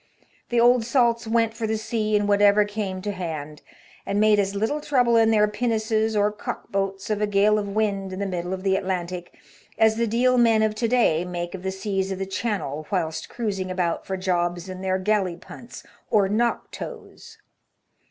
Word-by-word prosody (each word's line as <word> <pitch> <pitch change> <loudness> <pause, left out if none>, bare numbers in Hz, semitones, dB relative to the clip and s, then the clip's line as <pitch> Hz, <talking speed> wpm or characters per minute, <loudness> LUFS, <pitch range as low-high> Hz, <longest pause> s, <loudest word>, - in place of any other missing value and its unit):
The 240 - +2
old 240 0 +5
salts 235 -1 +1
went" 225 0 +1
for 225 -1 -3
the 220 0 0
sea 215 -1 -1
in 205 0 +2
whatever 205 0 +4
came 205 -3 -4
to 205 - -2
hand, 155 -5 -6 0.4
and 200 +1 -1
made 215 -1 +4
as 200 0 0
little 225 +9 -1
trouble 250 -5 +2
in 225 -1 +5
their 210 -1 +4
pinnaces 220 0 0
or 205 0 +2
cock 210 - -7
boats 195 +1 -2
of 210 0 -1
a 210 - +2
gale 205 +1 +3
of 205 - -4
wind 200 -3 0
in 185 - -6
the 200 - -2
middle 180 -2 -3
of 190 0 -4
the 190 -1 +2
Atlantic 180 -2 -4 0.4
as 220 0 +4
the 235 0 +1
Deal 250 +3 +2
men 225 -2 +4
of 215 -1 +1
to 230 +2 -1
day 220 -9 +2
make 175 -1 -5
of 190 - -6
the 190 - -2
seas 190 0 -2
of 190 - -3
the 195 - -3
Channel 190 - -3
whilst 165 -5 -2
cruising 200 -6 -3
about 180 -2 -1
for 190 - -2
jobs 175 -1 -1
in 185 0 -7
their 190 0 0
galley 190 -2 0
punts 235 +7 -12 0.3
or 205 -3 +3
"knock 230 +4 0
toes." - - -9
205 Hz, 200 wpm, -24 LUFS, 185-220 Hz, 0.4 s, old